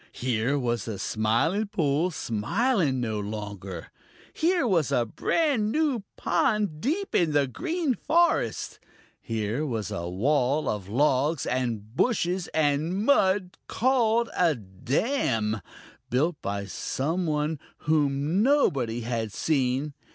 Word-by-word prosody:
Here 125 +2 0
was 120 -6 -1
the 110 -3 -4
Smiling 120 - 0
Pool 160 -2 +1
smiling 160 - 0
no 110 -3 -2
longer. 100 -4 -6 0.4
Here 340 -2 +2
was 170 - +2
a 120 - +2
brand 235 - 0
new 295 -6 +1 0.2
pond 205 -8 0
deep 355 - -1
in 165 -4 +2
the 145 -1 +3
Green 330 - -1
Forest. 340 +8 +1 0.4
Here 115 +4 -2
was 110 - -3
a 85 -4 -3
wall 135 +8 +1
of 100 -3 -3
logs 140 +5 +2
and 115 -3 -2
bushes 185 - +1
and 160 +6 0
mud 190 -8 +2
called 235 -2 +2
a 170 -4 +3
dam, 110 - -1 0.5
built 150 +6 0
by 100 0 -3
some 160 - -2
one 150 0 -1 0.2
whom 150 +3 +1
nobody 140 - +2
had 115 -2 -2
seen. 135 +2 0
145 Hz, 120 wpm, -26 LUFS, -, 0.5 s, the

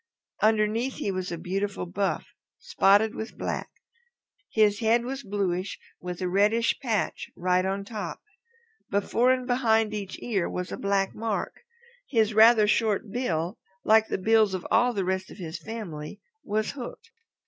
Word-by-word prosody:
Underneath 220 +4 +2
he 200 - -2
was 185 -1 -3
a 170 - -3
beautiful 195 +3 -3
buff, 190 +3 -1 0.3
spotted 205 +3 +3
with 220 - -7
black. - - -3 0.8
His 210 -2 +3
head 235 +1 +2
was 265 +2 -4
bluish 195 -3 -2 0.2
with 180 0 -6
a - - 0
reddish 210 +5 +2
patch 225 -5 -2
right 180 +1 +1
on 195 +1 -2
top. 205 -5 -5 0.7
Before 230 +5 +2
and 255 -1 0
behind 225 -4 +2
each 200 -3 -5
ear 200 -7 -1
was 180 0 -4
a - - -2
black 200 -1 0
mark. 220 -2 -3 0.5
His 225 -4 +2
rather 220 0 +7
short 210 -1 +1
bill, 180 -6 -2 0.2
like 220 0 +5
the - - -1
bills 215 0 +3
of 180 - -6
all 245 +2 +4
the 200 -5 -2
rest 190 0 -2
of - - -12
his 170 -3 -6
family, 190 -5 -7 0.2
was 215 +1 -1
hooked. 280 - -9
210 Hz, 155 wpm, -27 LUFS, 190-225 Hz, 0.8 s, rather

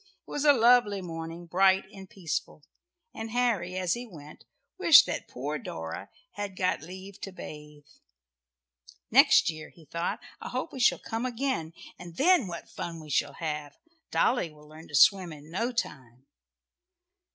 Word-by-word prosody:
It - - -12
was 290 0 -2
a 295 - +9
lovely 235 -5 +4
morning 165 -1 -7
bright 190 +3 +3
and 190 -1 -11
peaceful 165 -4 -4 0.5
and 225 0 -6
Harry, 220 -7 0
as 180 -2 +1
he 240 +1 -5
went, 150 -7 -13 0.3
wished - - +8
that - - -4
poor 145 +4 -4
Dora 80 -2 -6 0.2
had 205 -2 -5
got 185 -5 0
leave 190 +4 -10
to 195 - -6
bathe. 150 -4 -10 1.3
"Next - - +6
year," 155 -1 -9
he 165 - -19
thought, 170 +4 -3 0.2
"I - - -6
hope 255 +1 -4
we 265 - -6
shall 245 - +4
come 225 +1 -4
again, 245 - -2 0.3
and 175 -2 -10
then 330 - +4
what 170 -1 -7
fun 165 -1 -6
we 155 -2 -10
shall 145 +1 +1
have. 150 -3 -5 0.3
Dolly 240 -9 +2
will 150 -1 -17
learn 155 +2 -13
to 145 - -6
swim 185 +2 +5
in 150 +1 -12
no 230 +8 -1
time." 130 - -5
175 Hz, 165 wpm, -28 LUFS, 155-215 Hz, 1.3 s, a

